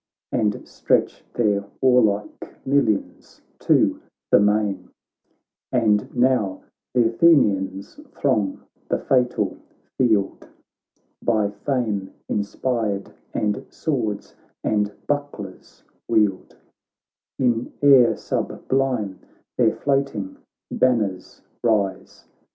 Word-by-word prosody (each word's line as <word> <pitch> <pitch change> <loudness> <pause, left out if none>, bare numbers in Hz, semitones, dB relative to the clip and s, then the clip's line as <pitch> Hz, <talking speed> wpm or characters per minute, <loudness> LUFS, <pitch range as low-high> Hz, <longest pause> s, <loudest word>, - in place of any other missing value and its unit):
And 105 -2 -1
stretch - - 0
their 105 -4 +1 0.2
warlike 110 -6 +1
millions 130 -7 0 0.2
to - - +3 0.3
the - - +7
main; 105 -1 +1 0.8
And 110 -4 +2
now 120 -7 +1 0.3
th' 120 -2 +4
Athenians 105 - +2 0.2
throng 110 -9 0 0.3
the - - +2
fatal 125 -2 0 0.4
field. 110 -6 +1 0.7
By 110 -3 +1
fame 105 -3 -2
inspired, 105 -1 -2 0.2
and 105 -1 -1
swords 115 -10 -3 0.3
and 105 -1 +1
buck 145 0 -1
lers 95 -3 -11 0.2
wield; 105 -4 +1 0.8
In 120 -3 0
air 135 -4 +7
sublime 125 -8 -2 0.4
their - - +3
floating 135 -9 -1 0.3
banners 110 -7 0 0.2
rise. 105 -5 -1
110 Hz, 85 wpm, -22 LUFS, 100-130 Hz, 0.8 s, the